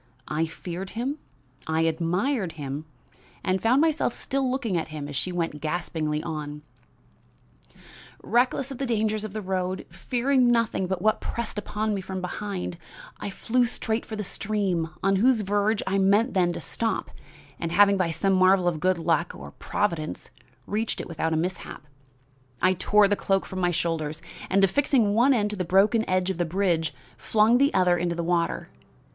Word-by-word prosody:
I 160 +2 0
feared 180 +3 -6
him, 270 +6 -2 0.5
I 160 0 +1
admired 175 - 0
him, 145 0 -5 0.6
and 185 0 0
found 250 +5 +4
myself 315 -6 +2
still 270 -1 -1
looking 250 -7 -1
at 165 - -1
him 155 -2 -6
as 145 - -7
she 180 +6 -1
went 165 -4 -3
gaspingly 155 -1 -2
on: 150 -2 -5 1.6
"Reckless 250 +3 +1
of 270 - -7
the 270 - -1
dangers 215 -2 0
of 215 -2 -6
the 215 -1 -4
road, 185 0 -2
fearing 250 +7 +1
nothing 230 -5 +1
but 185 0 -3
what 215 0 +2
pressed 230 -2 -3
upon 210 +1 -2
me 195 - -2
from 190 0 -5
behind, 180 -1 -4 0.4
I - - -4
flew 240 +5 +1
straight 225 -1 -1
for 220 - -7
the 210 - -3
stream, 195 -4 -1
on 195 0 +3
whose 235 +2 +4
verge 205 +2 +1
I 195 +1 +1
meant 205 +6 +3
then 180 -3 +3
to - - -5
stop, 225 +8 -2 0.5
and, 165 - -3
having 200 +3 +5
by 185 -3 +1
some 195 +4 +1
marvel 185 -1 +4
of 165 -3 0
good 185 +2 +2
luck 170 0 0
or - - -9
Providence 170 -7 -3 0.3
reached 215 +2 -2
it - - -5
without 160 -1 -2
a 160 - +1
mishap, 180 0 -4 0.8
I 185 +1 +4
tore 205 +3 +4
the 205 - +2
cloak 195 -1 0
from 190 - -6
my 180 -1 +2
shoulders, 160 -2 -2 0.3
and, 195 +1 +3
affixing 230 0 +3
one 240 +6 +4
end 210 -5 +2
to - - -3
the 185 - -2
broken 205 +5 +3
edge 185 0 +1
of 180 - -6
the - - +3
bridge, 170 -3 0 0.3
flung 220 +3 +3
the 280 +1 +4
other 180 -2 +3
into 170 0 -1
the 170 - -2
water. 170 0 0
190 Hz, 180 wpm, -26 LUFS, 170-215 Hz, 1.6 s, having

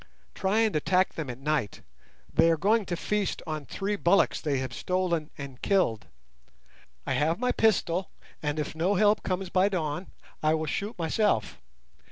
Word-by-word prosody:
Try 195 +3 +1
and 220 -5 +2
attack 185 +5 +2
them 155 -5 -5
at 120 - -5
night; 140 -6 -1 0.5
they 165 +1 +5
are 165 - +3
going 210 +5 +2
to 175 - -1
feast 205 +1 -1
on 155 -3 -5
three 205 +1 -2
bullocks 195 0 +3
they 145 -4 0
have 130 -2 -3
stolen 175 -1 -1
and 135 -3 -8
killed. 150 - +1 1.0
I - - -1
have 160 +3 +1
my 250 +2 +1
pistol, 185 -4 +1 0.3
and 150 0 -2
if 150 -1 -3
no 175 +6 +1
help 210 +2 +4
comes 185 0 -3
by 190 +1 +3
dawn 175 -1 -2 0.3
I 155 +1 +3
will 160 0 -2
shoot 205 +8 -3
myself. 165 - 0
175 Hz, 170 wpm, -28 LUFS, 150-195 Hz, 1.0 s, they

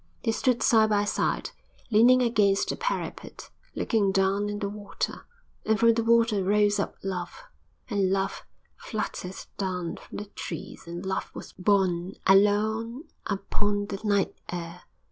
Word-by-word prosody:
They 225 - +2
stood 245 +1 +1
side 220 -2 +5
by 205 -1 +2
side, - - -1 0.4
leaning 245 +4 +6
against 205 -4 +2
the - - -1
parapet, - - -4 0.2
looking 205 -4 +1
down 195 +2 +1
at 205 0 -3
the 200 - -1
water.... 205 0 -5 0.4
And 220 0 +1
from 230 0 +6
the 230 0 0
water 230 -3 +3
rose 205 +1 +3
up 200 - -2
Love, 190 - -4 0.4
and 200 -5 +1
Love 195 0 -1 0.3
fluttered 195 -4 -5 0.2
down 180 -3 -2
from - - -10
the 205 - -5
trees, 170 -4 -8
and 175 +2 -6
Love 190 0 -2
was - - -9
borne 185 -2 +1
along 215 +6 +3 0.2
upon 205 0 -1
the 195 -1 -6
night 205 -2 +1 0.2
air. 175 0 -6
205 Hz, 145 wpm, -27 LUFS, 195-220 Hz, 0.4 s, leaning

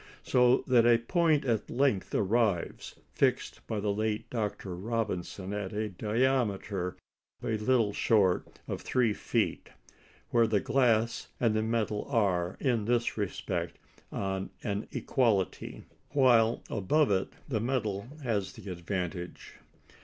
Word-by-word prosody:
So 125 0 +4
that 120 -2 +4
a 120 -1 +6
point 155 +4 +2
at 115 -4 0
length 125 -7 +1
arrives 105 -3 0 0.2
fixed - - +1
by 110 - -2
the 100 0 0
late 110 0 -1
Dr. 105 -5 -3
Robinson 100 -2 -3
at 105 -2 -4
a 105 +1 -2
diameter 105 -3 0 0.5
a - - -2
little 110 -1 +2
short 100 -5 +2 0.2
of - - -4
3 120 -4 +1
feet - - -1 0.6
where 115 -1 +4
the 105 -2 +2
glass 115 -2 +1
and 115 -3 +2
the 110 - +1
metal 110 -2 -1
are, 95 -8 +1
in 120 -6 +1
this 120 +1 +1
respect, 90 -4 -3 0.3
on 95 0 -3
an 105 -2 -2
equality; 110 -8 0 0.3
while 120 -4 +4
above 115 +7 +2
it 95 -1 0
the 115 -6 -1
metal 110 -4 -1 0.2
has 105 -6 -1
the 100 - -8
advantage. 90 0 -5
110 Hz, 130 wpm, -30 LUFS, 100-120 Hz, 0.6 s, a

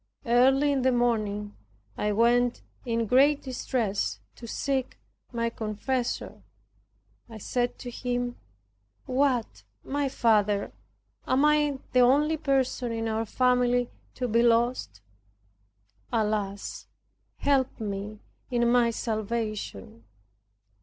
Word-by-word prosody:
Early 265 +4 +4
in 275 -2 +1
the 260 +1 +3
morning 215 -4 0 0.4
I 210 - -1
went 240 +3 +2 0.2
in 230 -1 0
great 280 +6 +4
distress 240 -5 -2 0.2
to 235 - -10
seek 265 +2 -2 0.3
my 230 -1 -1
confessor. 235 +4 -3 0.9
I 225 - -9
said 245 +3 -2
to 245 - -7
him, 245 0 -3 0.7
"What! 255 -3 0 0.2
my 285 0 -1
father, 210 -5 +2 0.5
am 265 +3 +3
I 300 -2 +3 0.2
the 255 - +4
only 285 +6 +4
person 265 -4 0
in 225 0 -2
our 225 0 -1
family 245 0 +2 0.2
to 250 - -2
be 230 +1 +3
lost? 235 - +1 1.1
Alas; 210 -2 -2 0.5
help 270 -3 +1
me 210 0 -5 0.3
in 240 -1 +1
my 240 -1 +4
salvation." 215 - -4
240 Hz, 105 wpm, -27 LUFS, 220-260 Hz, 1.1 s, Early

